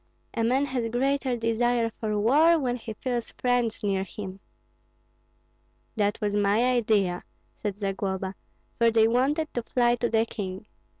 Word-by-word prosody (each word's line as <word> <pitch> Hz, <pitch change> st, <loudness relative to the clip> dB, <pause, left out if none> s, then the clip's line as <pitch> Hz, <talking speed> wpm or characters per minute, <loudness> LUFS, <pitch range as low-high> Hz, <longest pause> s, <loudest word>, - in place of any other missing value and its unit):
"A 230 Hz, -, -1 dB
man 260 Hz, +5 st, +2 dB
has 250 Hz, -4 st, -2 dB
greater 265 Hz, +1 st, 0 dB
desire 230 Hz, 0 st, +1 dB
for 215 Hz, -1 st, -2 dB
war 305 Hz, +10 st, +5 dB
when 250 Hz, -5 st, -1 dB
he 225 Hz, -2 st, -7 dB
feels 245 Hz, -1 st, -3 dB
friends 245 Hz, -3 st, 0 dB
near 195 Hz, -2 st, +1 dB
him." 195 Hz, 0 st, -8 dB, 1.6 s
"That 205 Hz, 0 st, 0 dB
was 205 Hz, -1 st, -1 dB
my 205 Hz, +3 st, +3 dB
idea," 215 Hz, -8 st, +2 dB, 0.4 s
said 205 Hz, -1 st, -3 dB
Zagloba; 195 Hz, -1 st, -2 dB, 0.5 s
"for 235 Hz, 0 st, +5 dB
they 225 Hz, -1 st, +4 dB
wanted 280 Hz, +7 st, +1 dB
to 240 Hz, -, -1 dB
fly 240 Hz, 0 st, +2 dB
to 240 Hz, 0 st, 0 dB
the 225 Hz, 0 st, +2 dB
king. 190 Hz, -3 st, -6 dB
230 Hz, 145 wpm, -26 LUFS, 205-245 Hz, 1.6 s, war